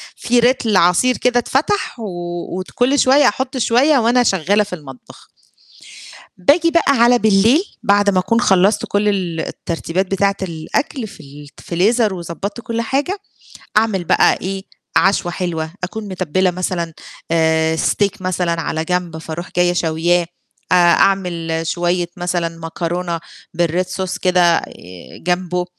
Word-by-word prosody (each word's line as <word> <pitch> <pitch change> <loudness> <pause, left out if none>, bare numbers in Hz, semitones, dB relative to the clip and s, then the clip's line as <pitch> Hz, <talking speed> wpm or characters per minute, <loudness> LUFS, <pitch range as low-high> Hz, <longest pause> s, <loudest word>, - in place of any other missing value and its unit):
في 240 0 +1
لتر 235 -4 +2
عصير 180 +10 +3
كده 245 -1 +2
اتفتح، 295 - -1
وت 175 -2 -5
كُلّ 265 +4 +2
شوية 275 +3 +5
أحط 260 0 -2
شوية 255 +5 +3
وأنا 245 +1 +3
شغّالة 200 0 +2
في 205 - -9
المطبخ. 135 -6 -14 1.1
باجي 315 - +3
بقى 335 -4 +3
على 240 +1 +6
بالليل، 220 - +4 0.2
بعد 205 0 +3
ما 190 -2 +2
أكون 230 +6 +1
خلّصت 195 +1 +3
كُلّ 205 +1 0
ال 180 -5 -2
الترتيبات 170 +3 -3
بتاعة 195 0 +1
الأكل 190 - -3
في - - -14
ال 145 +1 -12
ت - - -14
فريزر 210 +5 +1
وضبّطت 185 +5 -6
كُلّ 230 0 -3
حاجة، 280 - -1 0.6
أعمل 215 -4 +2
بقى - - +4
إيه، 190 +1 -4 0.3
عشوة 190 -2 +2
حلوة، 165 -3 -3
أكون 210 +3 -6
متبّلة 185 0 0
مثلًا 175 -2 -3 0.4
آآ 160 -1 +2
Steak 200 +3 0
مثلًا 180 -2 -1
على 160 0 -2
جنب 175 -1 -2
فاروح 160 +2 -7
جاية 175 0 +3
شاوياه، 170 +1 +1 0.5
أ - - +6
أعمل 175 -2 +2
شويّة 175 +1 0
مثلًا 175 -1 -1
مكرونة 170 +1 -3 0.4
بالRed 170 +2 0
Sauce 190 -1 -3
كده 180 -2 +4
آآ - - -2 0.6
جنبه، 180 0 0
185 Hz, 140 wpm, -18 LUFS, 170-220 Hz, 1.1 s, على